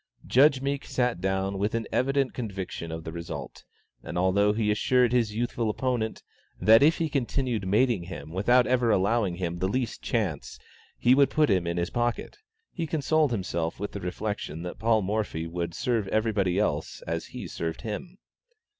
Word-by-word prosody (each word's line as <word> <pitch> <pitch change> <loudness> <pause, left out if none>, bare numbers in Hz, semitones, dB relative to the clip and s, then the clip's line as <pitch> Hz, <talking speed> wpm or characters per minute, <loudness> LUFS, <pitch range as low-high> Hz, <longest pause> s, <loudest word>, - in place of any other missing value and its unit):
Judge 135 0 +4
Meek 140 0 -1
sat 125 -7 -1
down 95 +1 -1
with 105 +3 0
an 115 - -1
evident 135 +1 +1
conviction 95 -7 -5
of 80 0 -5
the 80 - -6
result, 80 -6 -7 0.4
and - - -6
although 95 +3 +3
he 105 0 +1
assured 125 +3 +3
his 115 -4 +1
youthful 120 -1 -1
opponent, 115 -1 -2 0.4
that 110 +3 +6
if 155 +3 +5
he 165 - 0
continued 125 -6 -1
mating 105 -2 +2
him 85 -3 -8
without 120 +8 +3
ever 125 -2 +2
allowing 100 -2 +2
him 85 -1 -3
the 95 - +1
least 120 +3 -2
chance, 95 - -2 0.4
he 125 - +4
would 140 +1 +5
put 150 -6 +2
him 90 -3 +1
in 85 0 -2
his 85 0 -1
pocket, 120 - -2 0.3
he 165 -3 -3
consoled 155 0 +2
himself 90 -7 -2
with 105 - -4
the 100 - -6
reflection 90 -3 -4
that 90 - -6
Paul 110 -2 +2
Morphy 100 -5 -2
would 85 0 -4
serve 115 -5 0
everybody 100 -4 +1
else 80 -7 -1
as 85 0 -3
he - - -7
served 80 -1 -4
him. 150 - -6
105 Hz, 175 wpm, -27 LUFS, 90-125 Hz, 0.4 s, that